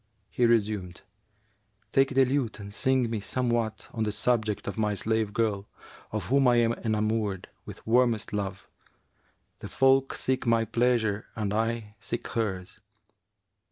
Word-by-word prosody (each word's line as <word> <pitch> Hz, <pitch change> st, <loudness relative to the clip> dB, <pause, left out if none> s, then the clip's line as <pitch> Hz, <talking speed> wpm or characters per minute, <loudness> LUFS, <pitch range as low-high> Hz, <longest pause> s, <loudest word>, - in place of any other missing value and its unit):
He 120 Hz, -, +2 dB
resumed, 105 Hz, -6 st, 0 dB, 0.9 s
'Take 135 Hz, -1 st, +2 dB
the 135 Hz, 0 st, +6 dB
lute 130 Hz, -4 st, -1 dB
and 100 Hz, 0 st, -8 dB
sing 130 Hz, +2 st, +2 dB
me 110 Hz, -, -1 dB
somewhat 120 Hz, 0 st, -1 dB
on 115 Hz, -, -4 dB
the 105 Hz, -1 st, +1 dB
subject 110 Hz, -2 st, 0 dB
of 100 Hz, -, -3 dB
my 105 Hz, -2 st, 0 dB
slave 110 Hz, 0 st, 0 dB
girl, 105 Hz, -2 st, -1 dB, 0.4 s
of 105 Hz, -4 st, -3 dB
whom 135 Hz, 0 st, +4 dB
I 120 Hz, -, +5 dB
am 115 Hz, -1 st, +3 dB
enamoured 110 Hz, -3 st, -1 dB, 0.2 s
with -, -, -11 dB
warmest 115 Hz, -2 st, +2 dB
love: 100 Hz, -3 st, -4 dB, 0.9 s
the -, -, -8 dB
folk 135 Hz, 0 st, +3 dB
seek 130 Hz, -1 st, -1 dB
my 115 Hz, -1 st, +3 dB
pleasure 115 Hz, -2 st, +1 dB
and 105 Hz, -2 st, -2 dB
I 110 Hz, -1 st, -2 dB
seek 120 Hz, -, -4 dB
hers.' 95 Hz, -6 st, -3 dB
110 Hz, 145 wpm, -27 LUFS, 105-120 Hz, 0.9 s, the